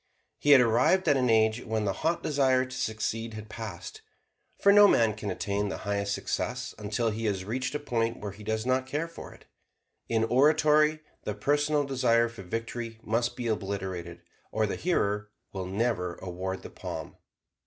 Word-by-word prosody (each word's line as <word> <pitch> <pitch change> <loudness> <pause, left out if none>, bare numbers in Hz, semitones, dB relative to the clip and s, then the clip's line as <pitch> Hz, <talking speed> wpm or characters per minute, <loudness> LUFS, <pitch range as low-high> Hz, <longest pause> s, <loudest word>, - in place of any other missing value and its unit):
He 145 - 0
had 140 -3 +9
arrived 125 +11 +3
at 145 - +5
an 130 -2 +2
age 110 +1 +3
when 110 -2 -1
the 100 - 0
hot 165 +2 0
desire 130 -3 +2
to 130 0 -9
succeed 115 0 -2
had 110 0 -8
passed. 105 -6 -7 0.6
For 200 - +6
no 205 0 +9
man 115 - +4
can 105 -1 -5
attain 100 +2 -1
the - - -4
highest 100 0 0
success - - -3
until 110 +2 -1
he 110 +2 -4
has 95 -3 -1
reached 130 +5 -2
a - - 0
point 115 -5 -1
where 105 -1 -5
he 105 +2 -12
does 110 +1 -2
not 130 +1 +1
care 150 +5 -2
for 165 - -10
it. - - -17 0.6
In 115 -1 +2
oratory 150 +4 +4 0.2
the - - -3
personal 145 +1 +1
desire 120 -4 +2
for 115 -3 -10
victory 115 +3 -5
must 120 +2 0
be 125 -1 -5
obliterated 95 -5 -3 0.3
or 110 0 +1
the 100 - -2
hearer 105 - 0 0.2
will 95 -2 -4
never 95 -3 -1
award 95 +1 -5
the - - -9
palm. - - -7
115 Hz, 180 wpm, -28 LUFS, 105-130 Hz, 0.6 s, had